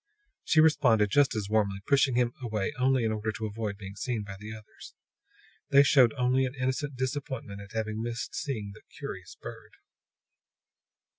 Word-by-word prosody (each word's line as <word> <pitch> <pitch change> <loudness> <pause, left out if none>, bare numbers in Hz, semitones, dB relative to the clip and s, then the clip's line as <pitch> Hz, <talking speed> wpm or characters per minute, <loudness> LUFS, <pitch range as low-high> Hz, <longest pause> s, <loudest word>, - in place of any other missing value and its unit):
She 160 - +3
responded 120 -10 +4
just 145 -1 +4
as 105 -2 -2
warmly, 100 -2 +1
pushing 135 -2 +3
him 120 -1 +2
away 110 +1 -2
only 130 -1 +3
in 110 - +1
order 110 0 -2
to 110 - -4
avoid 105 -1 -4
being 100 -1 -9
seen 120 -4 -2
by 100 -1 -8
the 105 +1 -8
others. 110 -1 -12 0.7
They 140 0 +7
showed 130 -4 +5
only 125 +1 +2
an 130 - -8
innocent 130 +2 -2
disappointment 130 -5 -4
at 100 +1 -12
having 110 -1 -2
missed 120 0 -4
seeing 110 -9 -3
the 105 - -15 0.2
"curious - - -7
bird." - - -10
115 Hz, 165 wpm, -29 LUFS, 105-130 Hz, 0.7 s, They